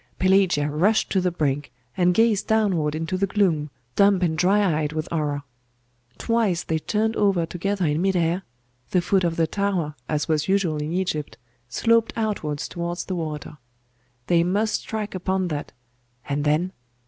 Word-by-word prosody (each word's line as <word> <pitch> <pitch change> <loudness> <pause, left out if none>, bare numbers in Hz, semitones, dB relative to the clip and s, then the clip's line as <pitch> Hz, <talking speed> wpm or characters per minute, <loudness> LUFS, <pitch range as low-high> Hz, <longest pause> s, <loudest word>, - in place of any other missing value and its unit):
Pelagia 185 -6 +3
rushed 180 +9 +2
to 190 - +2
the 180 - +2
brink, 145 -5 -1 0.2
and 180 -1 +3
gazed 225 -3 +3
downward 185 -9 +1
into 165 +3 -2
the 195 - +2
gloom, 175 -7 +1 0.3
dumb 200 -1 +5
and 160 -2 +1
dry 180 -2 +2
eyed 150 0 -2
with 155 0 -3
horror. 145 -3 -1 0.7
Twice 225 -7 +1
they 160 -1 -1
turned 220 +6 0
over 195 -5 +2
together 185 +3 -2
in 150 +1 +1
mid 190 0 +1
air.... 170 +1 +1 0.5
The 180 - +2
foot 185 +2 +2
of 170 -1 0
the 165 - +2
tower, 185 -4 -1 0.2
as 150 -1 0
was 155 -1 0
usual 190 -5 +1
in 150 +1 -3
Egypt, 175 -5 -2 0.3
sloped 230 - +2
outwards 200 -10 -2
towards 175 0 -4
the 185 - -3
water. 155 -3 -5 0.7
They 170 +2 +3
must 205 +4 0
strike 215 -1 -4
upon 185 0 -1
that 150 -2 -4 0.6
and 145 +1 -1
then! 155 +5 +1
175 Hz, 165 wpm, -24 LUFS, 155-200 Hz, 0.7 s, dumb